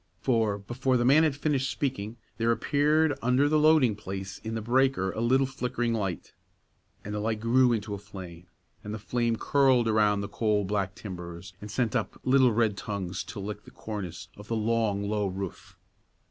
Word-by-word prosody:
For, 110 -5 +1
before 125 +5 0
the 120 - +1
man 140 +5 +6
had 155 -4 +2
finished 140 -2 0
speaking, 120 -5 -3 0.2
there 115 0 +2
appeared 150 +4 +2
under 125 +4 +3
the 155 +1 +3
loading 150 -7 +5
place 95 -1 -6
in 110 0 -5
the - - -1
breaker 120 -5 +2
a 110 - -4
little 130 +3 +3
flickering 125 -3 -2
light, 100 -5 -3 0.7
and 105 - -5
the 105 - -2
light 110 +1 -1
grew 120 +3 +4
into 105 -2 -2
a 100 - -4
flame, 90 -3 -10 0.4
and 105 +1 -5
the - - -4
flame 115 +2 0
curled 130 -1 +3
around 105 -2 +3
the 100 - -4
coal 105 -1 0
black 100 0 -1
timbers, 90 -3 -8
and 105 - -8
sent 115 +1 -1
up - - -2
little 130 -1 +5
red 110 -2 +1
tongues 95 -4 -4
to 95 +2 -7
lick 105 +1 -6
the - - -14
cornice 100 -6 -6
of 105 0 -11
the 115 - -1
long, 110 -2 0
low 105 -1 0
roof. 95 0 -6
110 Hz, 190 wpm, -28 LUFS, 100-125 Hz, 0.7 s, man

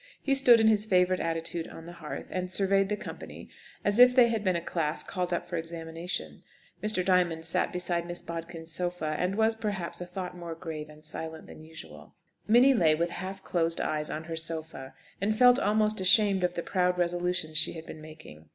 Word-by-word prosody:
He 275 - 0
stood 250 -4 +6
in 220 - +4
his 215 -1 +3
favourite 185 -1 +3
attitude 165 0 -2
on 165 - -11
the 170 - -9
hearth, 170 -3 -7
and 185 0 -3
surveyed 195 0 +2
the 210 - -1
company - - -9 0.4
as 205 +3 +4
if 250 0 +8
they 245 -2 +6
had 225 -2 -1
been 185 -3 +1
a - - +1
class 165 -2 -2
called 180 -2 -3
up 175 - -1
for 175 -1 -4
examination. 165 +1 -5 0.4
Mr. 210 -4 0
Diamond 175 -3 +2
sat 165 - 0
beside 175 -1 -2
Miss 175 0 -4
Bodkin's 165 0 -7
sofa, 175 -3 -2
and 180 +2 0
was, 220 +1 +3
perhaps, 205 -6 -3
a 175 - -5
thought 180 0 -6
more 170 -2 -7
grave 160 -3 -7
and 155 0 -15
silent 160 +1 -6
than - - -12
usual. 80 - -12 0.3
Minnie 245 +5 +6
lay 165 -10 +4
with 170 +2 -1
half 190 +2 -6
closed 165 -1 -1
eyes 150 -1 -1
on 155 - -4
her 165 0 -5
sofa, 160 -4 -6 0.3
and 215 +2 0
felt 250 +1 +6
almost 215 -1 +1
ashamed 190 0 +4
of 180 0 0
the 170 - -3
proud 180 -1 +1
resolutions 175 -2 0
she 155 - 0
had 160 -1 -9
been 155 - -9
making. 155 - -13
175 Hz, 205 wpm, -28 LUFS, 160-195 Hz, 0.4 s, if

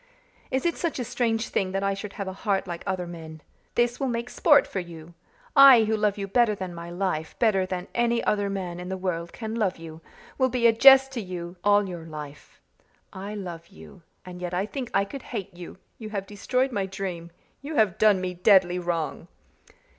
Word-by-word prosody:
Is 260 +3 -1
it 340 - 0
such 335 -4 -2
a 250 - -2
strange 235 -2 -1
thing 185 -1 -1
that 195 0 -1
I 195 0 +1
should 195 +1 -7
have 200 -2 -5
a 190 - -4
heart 195 -1 -1
like 175 -2 -6
other 185 -2 -2
men? 160 -2 -9 0.4
This 240 0 +1
will 270 - 0
make 235 0 -3
sport 295 -4 +5
for 190 - -4
you! 170 -1 -10 0.4
I, 275 -4 +9
who 220 0 +1
love 210 -1 0
you 200 -1 -4
better 220 +1 +2
than 185 -2 -6
my 170 0 -8
life, 175 -3 -3
better 195 -5 +2
than 185 -1 -4
any 235 0 +1
other 205 -1 0
man 180 -3 -4
in 180 +1 -7
the 190 - -3
world 170 -2 -3
can 220 -2 -6
love 210 -5 0
you, 165 -1 -10 0.4
will 260 -1 +3
be 245 -1 0
a 230 - +7
jest 270 +3 +7
to 250 -3 -4
you 180 -2 -7
all 205 -1 +4
your 175 -3 -7
life. 150 -2 -10 0.5
I 200 +3 -6
love 175 -4 -7
you 190 -1 -15 0.2
and 180 -1 -9
yet 180 0 -3
I 190 +2 0
think 250 +2 -5
I 200 0 +2
could 275 +6 -8
hate 200 -6 -6
you 175 0 -10 0.2
you 220 -2 -7
have 200 -2 -4
destroyed 250 +6 -1
my 200 -4 -2
dream 185 -3 -5 0.3
you 295 +3 -6
have 215 -7 +2
done 210 -3 +5
me 185 0 -3
deadly 180 -1 +4
wrong." 170 -3 -3
195 Hz, 215 wpm, -26 LUFS, 180-230 Hz, 0.5 s, I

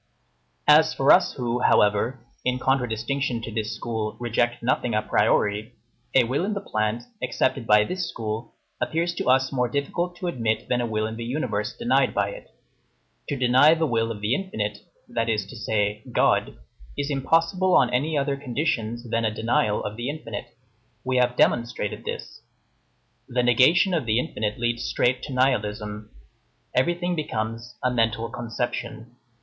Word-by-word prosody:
As 155 +1 +6
for 135 - +4
us, 180 -1 +5
who, 120 -2 -2
however, 110 +3 +3 0.2
in 125 0 0
contradistinction 125 0 0
to 115 - -5
this 110 0 -2
school, 110 -2 -4
reject 120 0 0
nothing 120 -1 0
a 110 - +1
priori, 105 +1 +1 0.4
a 130 - +7
will 130 +8 -1
in 205 +2 -1
the - - -1
plant, 110 - -2 0.2
accepted 125 -2 0
by 105 0 +6
this 180 +6 -3
school, 110 -6 -5 0.3
appears 170 +2 0
to - - -4
us 130 +1 +3
more 125 -3 0
difficult 170 +7 -2
to 180 - -7
admit 115 -10 -1
than 125 -1 +1
a 120 - -1
will 110 -1 -1
in 110 +1 -5
the 115 - -5
universe 115 -4 -2
denied 130 +2 +2
by 100 0 +1
it. - - -11 0.8
To 145 - -1
deny 130 +5 +5
the 160 0 +1
will 115 -4 0
of 105 -2 -7
the 105 +3 +1
infinite, 105 - -3 0.3
that 115 0 -1
is 105 -3 0
to 100 - -11
say, 105 -1 -1
God, - - +2 0.4
is 145 +1 -2
impossible 165 +7 +2
on - - +3
any 150 +5 +1
other 140 0 0
conditions 125 -4 -2
than 115 0 0
a 110 - +2
denial 110 +1 0
of 105 +1 -5
the 120 +3 -3
infinite. 130 -9 -7 0.5
We 130 0 0
have 125 0 +2
demonstrated 120 -4 0
this. - - -6 0.9
The 125 0 0
negation 155 - +4
of 155 -8 0
the 110 0 +2
infinite 105 -4 -2
leads 120 0 -1
straight 125 +1 +1
to 145 - -8
nihilism. 105 -5 -1 0.6
Everything 175 +6 +1
becomes 115 -4 -4
"a 125 - +2
mental 115 -1 0
conception." 120 0 -4
120 Hz, 165 wpm, -25 LUFS, 110-140 Hz, 0.9 s, a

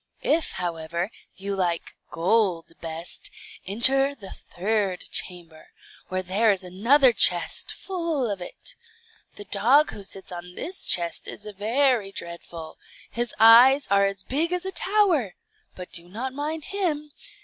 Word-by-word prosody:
If, 325 +1 +1
however, 170 +1 -3 0.2
you 200 +1 -4
like 175 -3 -2
gold 180 -1 +1
best, 165 +1 -4 0.4
enter 270 +7 +5
the 200 -7 -10
third 195 -1 -2
chamber, 170 -3 -4 0.4
where 185 0 -3
there 200 +5 +2
is 195 -2 +1
another 235 +9 +4
chest 175 -4 +1
full 335 -8 -3
of 200 -3 -4
it. - - -8 0.6
The 205 - -10
dog 240 +11 +3
who 205 - -8
sits 195 -1 -7
on 180 0 -9
this 370 +3 -2
chest 170 -1 +1
is 210 - -6
very 220 +1 +1
dreadful; 170 -3 -9 0.3
his 240 -1 -3
eyes 245 +5 +7
are 200 0 +4
as 195 -1 -2
big 310 - -1
as 360 +1 -2
a 380 - -3
tower, 370 - +1 0.4
but 180 -1 -9
do 170 +1 -2
not 250 +7 -5
mind 300 +3 -4
him. 305 -7 -2
205 Hz, 140 wpm, -25 LUFS, 180-275 Hz, 0.6 s, eyes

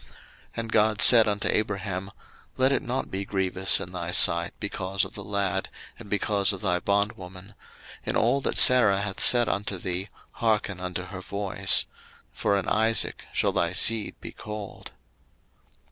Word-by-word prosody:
01:021:012 - - -21 0.5
And 115 -1 -5
God 110 0 +2
said 115 -3 +8
unto 105 -1 -1
Abraham, 95 -2 -3 0.5
Let 130 +1 +2
it 140 - 0
not 130 -1 -4
be 95 +1 -3
grievous 95 -1 -1
in 90 - -8
thy 85 -2 -6
sight 85 -1 +4
because 95 -1 -3
of - - -12
the 100 - -9
lad, 100 -1 -2 0.3
and - - -12
because 100 -1 0
of 95 -2 -7
thy 90 0 0
bondwoman; 100 -1 -3 0.5
in - - -4
all 140 - +1
that - - -2
Sarah 105 -6 +6
hath 100 -1 -5
said 120 -1 +6
unto 100 -1 -3
thee, 90 +2 -5 0.2
hearken 105 -4 -2
unto 90 0 -5
her 90 0 -9
voice; 95 0 0 0.5
for 100 - -1
in 100 - -4
Isaac 110 +1 0
shall - - 0
thy 85 +1 -1
seed 110 +3 +2
be - - -9
called. 105 -2 -9
100 Hz, 160 wpm, -25 LUFS, 95-105 Hz, 0.5 s, said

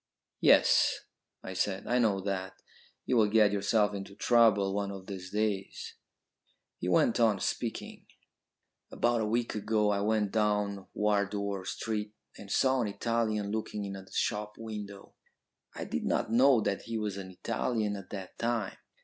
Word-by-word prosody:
"Yes," - - +5 0.4
I 95 - -6
said, 95 +1 -1
"I 125 +1 +1
know 105 -5 +2
that. 95 -1 -4 0.5
You 125 - +1
will 110 -2 +4
get 105 -1 +5
yourself 105 +1 +2
into 100 0 -7
trouble 105 -5 +4
one 100 0 -1
of 95 -1 -8
these 95 -2 -7
days." 105 -1 -2 0.9
He 90 - -2
went 100 +7 +3
on 110 -4 +3
speaking. - - -4 0.8
"About 120 -1 +1
a 110 - 0
week 115 +2 0
ago 105 0 +1
I 100 0 0
went 105 -1 +1
down 105 -2 0
Wardour 100 -2 0
Street 105 +1 -3 0.2
and 100 -1 -10
saw 130 -1 +3
an 115 - 0
Italian 110 -1 -1
looking 105 -1 -3
in 100 0 -5
at 95 -1 -10
a - - -23
shop 105 -1 -1
window. 105 -3 -8 0.6
I - - -5
did - - -3
not - - 0
know 125 0 +5
that 100 -2 -1
he 115 0 -4
was 105 -2 -3
an 95 -1 -7
Italian 110 +2 -2
at 100 -2 -9
the 95 -3 -7
time. 115 -4 -1
105 Hz, 160 wpm, -30 LUFS, 100-110 Hz, 0.9 s, Yes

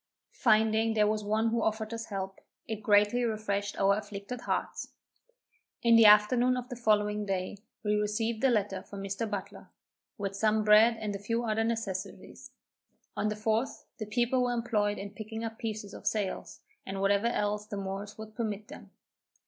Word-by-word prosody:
Finding 220 -1 +3
there 210 -1 +4
was 215 0 0
one 215 +2 +1
who 230 0 0
offered 220 +1 -1
us 230 0 -5
help, 195 -1 -5 0.3
it 220 -1 -4
greatly 210 +3 +4
refreshed 205 -3 -2
our 195 0 +4
afflicted 205 +3 -6
hearts. - - -3 0.9
In 235 -1 +6
the 225 -1 +8
afternoon 240 +5 +5
of 250 0 -5
the 245 - -5
following 210 -2 +1
day, 190 +1 -2 0.2
we 210 -1 +1
received 220 +3 -1
a 265 - +5
letter 205 -5 0
from 195 0 -9
Mr. 200 +3 -3
Butler, 200 -2 -6 0.5
with 200 -2 -3
some 215 +1 +2
bread 215 +2 +6
and 210 -2 -3
a - - -5
few 230 +4 -1
other 225 -1 0
necessaries. 210 -4 -4 0.7
On 215 - 0
the 210 - -2
4th, 220 +4 -1 0.2
the 215 - -4
people 240 +3 +1
were 245 -1 +1
employed 220 -3 0
in 200 0 -6
picking 220 +1 -7
up 225 0 -5
pieces 215 -3 -5
of - - -8
sails, 205 -4 -2 0.2
and 195 0 -5
whatever 200 +3 +2
else 210 -2 -1
the 205 - -5
Moors 195 +1 -5
would 215 0 -9
permit 215 -2 -4
them. 295 - -11
215 Hz, 175 wpm, -30 LUFS, 205-225 Hz, 0.9 s, the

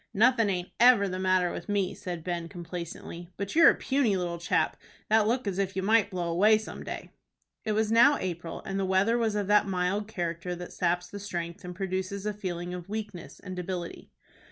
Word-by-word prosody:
"Nothin' 230 0 +4
aint 180 -2 -2
ever 240 -4 +6
the 185 0 -3
matter 185 -1 +2
with - - -7
me," 200 -2 0
said 175 -3 -6
Ben, 170 -1 -3
complacently; 170 -1 -7
"but 200 +5 -4
you're 335 0 +9
a - - +3
puny 260 -8 +1
little 175 -1 -3
chap, 170 - +1 0.3
that 215 -1 +4
look 245 +2 0
as 195 -1 -2
if 195 -1 -1
you 190 - -1
might 215 0 +4
blow 180 -3 -3
away 205 +6 +5
some 215 - -7
day." - - -7 0.5
It 215 - 0
was 215 0 +1
now 240 +5 +6
April, 170 -2 -5
and 195 0 -2
the 195 - 0
weather 190 +5 +3
was 220 -2 0
of 205 -1 0
that 205 +1 +4
mild 190 +2 -1
character 175 -3 -3
that 175 0 -8
saps 180 0 0
the 205 - -8
strength 175 -3 -5
and 180 0 -7
produces 190 +1 -3
a 210 - -1
feeling 180 -3 -4
of 180 +1 -7
weakness 205 -8 -6
and 185 -2 -7
debility. 180 -1 -5
190 Hz, 205 wpm, -28 LUFS, 175-210 Hz, 0.5 s, you're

